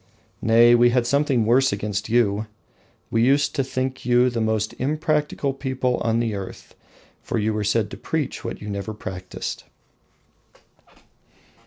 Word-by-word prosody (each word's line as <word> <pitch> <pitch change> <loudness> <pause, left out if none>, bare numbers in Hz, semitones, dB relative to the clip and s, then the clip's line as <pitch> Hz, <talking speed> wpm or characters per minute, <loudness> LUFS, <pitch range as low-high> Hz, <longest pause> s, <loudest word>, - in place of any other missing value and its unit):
Nay, 115 +1 +6
we 120 0 +6
had 120 0 +1
something 140 -3 +2
worse 130 +4 +4
against 105 +1 -3
you: 110 -2 +2 0.6
we 115 0 +2
used 140 +3 +3
to 135 - 0
think 130 0 -3
you 125 +1 +3
the 115 -1 -2
most 110 -1 0
impracticable 150 0 0
people 130 -2 -1
on 115 0 0
the 115 -2 -1
earth, 100 -2 -8 0.5
for - - -3
you 110 0 0
were 105 0 -1
said 105 0 0
to - - -7
preach 155 -4 -3
what - - -6
you - - -7
never 100 +2 -4
practiced. 95 -3 -6
120 Hz, 150 wpm, -23 LUFS, 110-130 Hz, 0.6 s, Nay